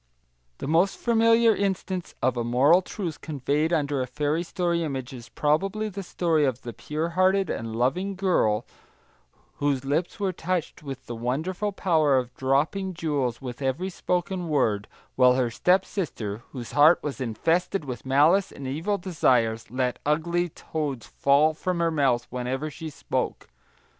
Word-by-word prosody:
The - - -5
most 170 +6 +2
familiar 230 -1 +4
instance 190 -2 -2
of 130 0 +2
a 120 - -1
moral 135 +9 +4
truth 175 - -5
conveyed 150 +2 -1
under 145 -4 +1
a 125 - -2
fairy 150 +5 -1
story 175 -1 -1
image 135 -4 -4
is 120 -2 -10
probably 195 +9 0
the 200 0 -6
story 170 -4 +1
of 130 -3 -1
the 120 - -6
pure 155 +2 -3
hearted 185 +2 +2
and 115 -1 -4
loving 180 +12 0
girl 145 - +1 0.9
whose 140 -2 0
lips 160 +8 -1
were 195 -2 0
touched 180 -1 -3
with 135 -3 -7
the 120 - -6
wonderful 155 - -2
power 160 -8 +2
of 125 -1 -2
dropping 155 +9 0
jewels 140 -7 -2
with 125 +1 -6
every 140 +8 -1
spoken 180 0 -2
word, 110 -9 +1 0.3
while 125 -1 +5
her 125 -2 +1
stepsister, 160 - 0
whose 120 -4 -7
heart 150 +4 +5
was 140 -2 -4
infested 165 - 0
with 125 -4 -6
malice 155 +9 +3
and 140 - -9
evil 165 +10 -1
desires, 125 - +1
let 125 0 -1
ugly 170 +4 0
toads 145 -6 -4
fall 145 +3 +3
from 180 +3 -2
her 170 -1 +2
mouth 135 -6 +2
whenever 130 +4 -3
she 160 +1 -7
spoke. 150 - -3
150 Hz, 155 wpm, -26 LUFS, 130-180 Hz, 0.9 s, while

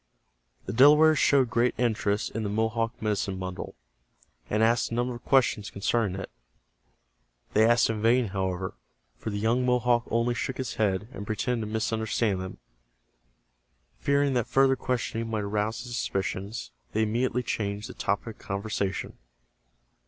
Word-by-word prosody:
The - - -4
Delawares 150 +5 +6
showed 130 -5 +4
great 120 +1 +2
interest 110 -3 0
in 115 - -3
the 105 - -2
Mohawk 110 +2 -1
medicine 100 -3 -1
bundle, 95 -1 -6 0.7
and 105 +1 +2
asked 115 +1 +3
a 115 - -3
number 120 +1 0
of 120 - -10
questions 115 -6 +2
concerning 100 -1 0
it. - - -7 1.2
They 110 +1 +5
asked 120 0 +4
in 110 -2 -2
vain, 115 0 +3
however, 95 -1 -2 0.5
for - - -4
the 100 - -3
young 115 +4 +1
Mohawk 125 -1 +2
only 115 +1 +1
shook 130 +2 -3
his 130 -2 -3
head, 105 -1 0
and 100 - -7
pretended 115 0 -1
to - - -7
misunderstand 110 -2 0
them. 95 0 -7 1.4
Fearing 140 -1 +2
that 120 -3 0
further 135 0 +4
questioning 115 -3 -2
might 110 -2 -1
arouse 105 +2 -1
his 120 -1 -6
suspicions, 95 - -3 0.2
they 110 - +2
immediately 120 +3 0
changed 105 -2 -3
the - - -9
topic 105 +2 -2
of - - -17
conversation. 100 -1 -3
110 Hz, 150 wpm, -27 LUFS, 105-120 Hz, 1.4 s, Delawares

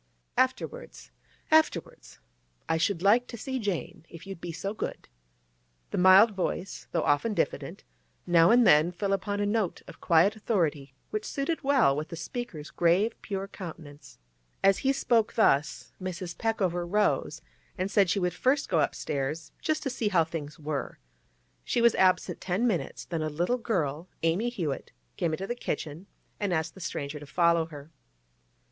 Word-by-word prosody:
'Afterwards—afterwards. 310 - -1 0.5
I 160 - +1
should 175 +1 0
like 230 +5 +4
to 235 - -8
see 260 +3 -3
Jane, 200 -7 -3
if 165 +2 -11
you'll 195 0 -6
be 170 0 -7
so 190 +5 -4
good.' - - -5 0.8
The - - -1
mild 190 +5 +7
voice, 190 -1 -4
though 165 - 0
often 175 +10 +1
diffident, - - -2 0.4
now 170 -1 +5
and 240 0 +6
then 155 +1 +5
fell 195 +3 -1
upon 205 +1 -2
a 205 - +1
note 205 -3 -1
of - - -13
quiet 175 +5 +4
authority 155 - -1 0.2
which 215 0 -2
suited 285 +7 -2
well 270 - +4
with 155 +2 -4
the - - -6
speaker's 165 -3 -6
grave, 180 +7 +2
pure 195 -2 -4
countenance. 160 -7 -10 0.5
As 195 0 +5
he 270 - +2
spoke 235 -5 +1
thus, 155 -9 +2
Mrs. 185 -1 -5
Peckover 190 -6 0
rose, 205 +4 0 0.3
and 190 +1 -2
said 200 -4 +4
she 175 - +1
would 180 -1 0
first 275 +2 +1
go 170 - +2
upstairs 145 +1 -2
just 310 -1 -1
to 270 - -2
see 235 -3 -1
how 175 -5 +4
things 155 -2 -6
were. 150 -2 -4 0.7
She - - 0
was 235 -1 +5
absent 185 -1 +2
ten 185 +6 0
minutes, 175 - -1
then 165 -2 -3
a 155 - -1
little 175 +11 0
girl—Amy 170 +1 -1
Hewett—came 155 - -4
into 185 +5 -3
the 240 - -2
kitchen 160 -5 -5 0.3
and 205 -2 -1
asked 160 -1 -1
the 190 - -13
stranger 145 -2 -4
to 145 - -11
follow 170 +1 +2
her. 150 -1 -11
185 Hz, 160 wpm, -28 LUFS, 160-215 Hz, 0.8 s, mild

